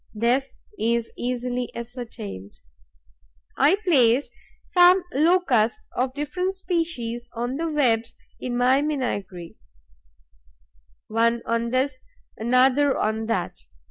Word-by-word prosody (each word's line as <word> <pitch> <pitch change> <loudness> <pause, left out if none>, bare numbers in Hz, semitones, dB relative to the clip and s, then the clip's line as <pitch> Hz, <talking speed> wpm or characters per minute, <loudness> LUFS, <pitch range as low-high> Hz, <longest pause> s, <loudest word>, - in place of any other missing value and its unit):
This 245 +5 +1 0.3
is 235 0 0
easily 245 0 -3
ascertained. 230 - -8 1.0
I 295 +7 +4
place 260 -6 +3 0.3
some 360 +1 +5
Locusts 320 - +2
of 255 +1 -1
different 360 +6 -2
species 325 -11 -3
on 245 +3 -3
the 330 +1 -2
webs 235 -6 +1 0.2
in 245 -1 -3
my 255 +3 +4
menagerie, 205 - -3 1.5
one 230 +1 +1
on 230 0 -1
this, 255 +1 -1 0.3
another 255 +4 +3
on 220 +1 -1
that. 225 -6 -2
250 Hz, 100 wpm, -24 LUFS, 230-290 Hz, 1.5 s, some